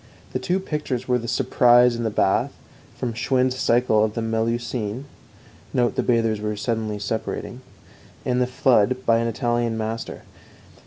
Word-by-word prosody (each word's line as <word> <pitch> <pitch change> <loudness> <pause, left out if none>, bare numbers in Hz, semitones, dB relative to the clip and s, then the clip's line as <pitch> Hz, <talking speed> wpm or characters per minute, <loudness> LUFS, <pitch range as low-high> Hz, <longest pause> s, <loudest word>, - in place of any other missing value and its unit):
The - - -1
two 185 0 0
pictures 150 -8 -3
were 125 -1 +2
The 115 - -6
Surprise 120 -1 +4
in 120 - -4
the 110 - 0
Bath, 95 -2 +1 0.4
from 120 -2 -3
Schwind's 130 +2 +1
Cycle 115 -3 +3
of 110 -1 -1
the 115 - -1
Melusine 115 +1 -2 0.7
(note 120 -3 +2
the - - 0
bathers 115 -3 +1 0.2
suddenly 110 -2 -2
separating), 105 +2 -4 0.6
and 125 0 +1
The 125 - +2
Flood, 130 -1 +2
by 115 0 +4
an 115 - 0
Italian 120 0 -1
master. 110 +1 -4
120 Hz, 150 wpm, -23 LUFS, 110-125 Hz, 0.7 s, Surprise